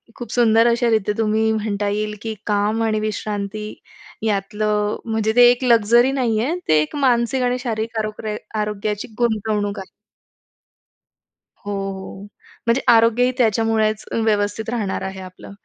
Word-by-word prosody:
खूप 240 -3 -8
सुंदर 230 -1 +4
अशा 235 0 +2
रित्या 215 -2 +1
तुम्ही 220 0 +1
म्हणता 205 -1 -2
येईल, 210 +1 -2
की 225 -1 -4
काम 210 +2 +1
आणि 215 -1 0
विश्रांती 210 0 -4 0.5
यातलं 210 +1 0
म्हणजे 220 -1 0
ते 245 0 +8
एक 245 +1 -2
लक्झरी 235 +1 +4
नाहीये, 245 +1 0
ते 155 -1 +4
एक 150 - -4
मानसिक 255 -2 +1
आणि 250 0 +1
शारीरिक 225 -2 -3
आरोग्र 215 0 -4 0.3
आरोग्याची 210 +2 -3
गुंतवणूक 215 -3 0
आहे. 190 - -9 1.8
हो, 205 - -4 0.2
हो. 190 +1 -9 0.4
म्हणजे 235 +3 +3
आरोग्यही 230 +2 +4
त्याच्यामुळेच 220 -2 +1 0.2
व्यवस्थित 210 0 0
राहणार 220 -5 -2
आहे 190 0 -5
आपलं. 185 +1 -11
220 Hz, 135 wpm, -20 LUFS, 210-230 Hz, 1.8 s, ते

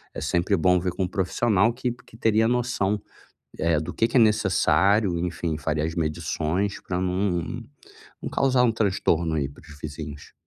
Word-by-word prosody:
é - - -5
sempre 90 +4 +1
bom 90 +2 +3
ver 90 +1 -1
com 95 - -2
um - - 0
profissional 100 +3 +1
que 125 0 -2
que 120 -2 -14
teria 110 -1 +3
noção 120 -4 0 0.8
do - - -5
que 115 - +2
que 120 - +1
é - - +7
necessário 100 -3 +3
enfim, 85 -2 -2
faria 75 0 -1
as 80 0 -4
medições 85 +4 -1
para 90 -1 -3
não 90 -1 -1 0.6
não - - -4
causar 130 -2 +2
um 120 - +4
transtorno 90 -6 +1
aí 70 -3 0
para 70 - -16
os 75 -2 -14
vizinhos. 75 -1 -8
95 Hz, 170 wpm, -25 LUFS, 80-110 Hz, 0.8 s, é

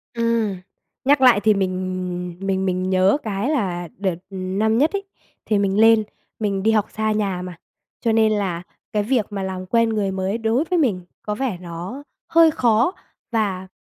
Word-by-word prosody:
Ừm. 230 -3 +1 0.5
Nhắc 280 0 +4
lại 250 -5 +7
thì 215 0 +5
mình 185 -2 -3
mình 190 0 -1
mình 185 0 -1
nhớ 190 +5 +4
cái 210 +3 -2
là 185 - -1
đợt 190 -2 -1
năm 195 +3 0
nhất 300 +6 +3
ấy, 400 0 -2 0.4
thì 210 -2 +2
mình 200 0 +1
lên 225 0 +6 0.4
mình 200 -3 -1
đi 220 - +4
học 215 -2 +2
xa 220 0 -1
nhà 200 -4 -1
mà, 180 -2 -7 0.4
cho 230 - +1
nên 220 -1 +4
là 190 -5 -1 0.3
cái 210 -1 +1
việc 230 -1 +1
mà 200 -2 -4
làm 185 -1 -4
quen 230 +4 +2
người 210 -3 0
mới 190 +3 -1
đối 230 +4 +1
với 350 +1 0
mình 220 - +1 0.2
có 210 - -3
vẻ 240 -5 -2
nó 180 +10 -7 0.3
hơi 330 -1 +6
khó. 235 +1 +2 0.4
Và, 200 -5 -1
205 Hz, 180 wpm, -22 LUFS, 185-225 Hz, 0.5 s, lại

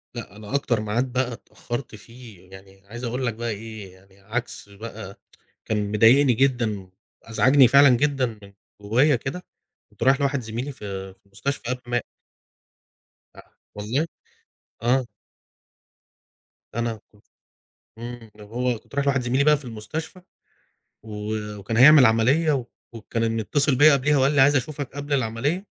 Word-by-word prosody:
لأ 100 - -8
أنا 105 +5 -6
أكتر 120 -5 0
ميعاد 115 +5 -1
بقى 125 0 -1
اتأخرت 120 0 -7
فيه، 110 -5 -15
يعني 95 0 -16
عايز 120 +3 -9
أقول 125 +2 -2
لك 115 - -1
بقى 120 +1 -4
إيه 105 -3 -7
يعني 95 +1 -22
عكس 110 +1 -5
بقى، 105 -1 -9 0.5
كان 105 -2 -2
مضايقني 125 +5 +5
جدًا 115 -7 0 0.3
وأزعجني 130 +3 +4
فعلًا 140 +2 +7
جدًا 135 +1 +2 0.2
من 100 0 -14 0.3
جوايا 125 +8 +3
كده، 135 +9 -6 0.5
كنت - - -14
رايح 135 +2 +4
لواحد 140 -1 0
زميلي 120 +5 -5
في 95 -5 -7
في 95 - -39
المستشفى 100 +9 -4
قام - - -11
مات. 120 -1 -1 1.3
أ - - -12 0.3
والله، 115 +10 -2 0.8
آه. 125 +1 +2 1.7
أنا 115 -2 -2
كنت 105 -1 -26 0.7
امم، 115 -1 -9
لو 105 -1 -13
هو 120 +1 -2
كنت - - -16
رايح 140 0 0
لواحد 135 -2 +2
زميلي 130 +3 +1
بقى 150 0 +5
في 140 - -13
المستشفى، 140 - -7 0.8
و 105 0 -5 0.2
وكان 100 +3 -4
هيعمل 135 +1 +8
عملية 130 +4 +2 0.3
وكان 115 0 -2
متصل 140 +5 +1
بيا 150 +3 +7
قبليها 140 +1 +2
وقال 135 +2 +3
لي 145 - +3
عايز 145 +2 +5
أشوفك 140 0 -4
قبل 145 +1 -5
العملية 135 - -1
120 Hz, 145 wpm, -23 LUFS, 110-135 Hz, 1.7 s, هيعمل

